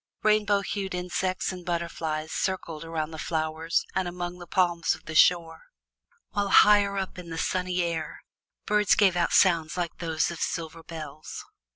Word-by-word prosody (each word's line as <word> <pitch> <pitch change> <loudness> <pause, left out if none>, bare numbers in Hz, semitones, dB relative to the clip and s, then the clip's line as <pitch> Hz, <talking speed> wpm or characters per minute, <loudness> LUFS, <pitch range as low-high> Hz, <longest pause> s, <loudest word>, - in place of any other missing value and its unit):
Rainbow 210 -1 +3
hued 195 -1 -3
insects 180 +1 -2
and 180 -1 -8
butterflies 165 -3 -3
circled 170 -4 -3
around 165 -1 -3
the 160 - -8
flowers 160 +1 -1
and 190 -1 0
among 175 0 -5
the 175 - -10
palms 175 -1 +1
of - - -18
the 160 - -6
shore, 165 0 +3 0.7
while 200 -1 -1
higher 205 -1 +6
up 190 -1 -4
in 175 -2 -9
the 165 - -5
sunny 180 +1 0
air 165 -2 -4 0.4
birds 210 -1 +3
gave 195 -4 +4
out 175 - +1
sounds 170 -3 +3
like 175 -2 -3
those 165 -1 0
of 170 - -7
silver 165 0 -3
bells. 155 -2 -8
175 Hz, 165 wpm, -27 LUFS, 165-185 Hz, 0.7 s, higher